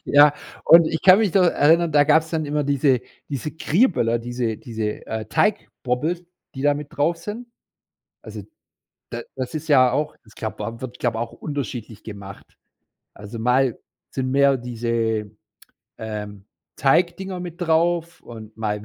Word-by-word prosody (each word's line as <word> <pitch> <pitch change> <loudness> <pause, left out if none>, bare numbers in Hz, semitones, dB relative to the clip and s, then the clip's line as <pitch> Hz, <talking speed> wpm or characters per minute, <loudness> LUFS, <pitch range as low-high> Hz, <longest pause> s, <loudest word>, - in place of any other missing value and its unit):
Ja, 145 0 +6 0.3
und 165 -1 +8
ich 160 0 -2
kann 185 +1 +8
mich 215 -5 +1
noch 195 - +5
erinnern, 170 0 +3
da 145 0 +5
gab's 160 +2 +3
dann 160 -2 -1
immer 150 0 -1
diese 135 -2 +2 0.3
diese 140 +1 -4
„Kriböller“, 160 - +2
diese 120 -1 -3
diese, 110 -2 -5
äh, 110 -1 -4
„Teigbobbels“, 160 - -1 0.3
die 135 - -5
da 145 0 +4
mit 145 0 -6
drauf 165 +4 +1
sind. 215 +8 -7 0.8
Also - - -8 0.7
da - - -4 0.2
das - - -4
ist 155 +1 -5
ja 130 -4 +5
auch 150 +2 -2
das 110 - -20
glaube 110 -2 -5
au 115 0 -7
wird 125 -1 -7
glaube, 120 -2 -1
auch 115 0 -4
unterschiedlich 120 -7 -6
gemacht. 100 -3 -10 0.6
Also 105 +3 -9
mal 125 +2 +2 0.3
sind 130 -1 -2
mehr 140 0 +4
diese, 115 -3 -2 0.7
ähm, 105 -2 -6 0.3
„Teigdinger“ 180 +6 +1
mit 175 0 -8
drauf 170 0 +1
und 110 -2 -11
mal 105 -2 -3
135 Hz, 155 wpm, -22 LUFS, 115-160 Hz, 0.8 s, und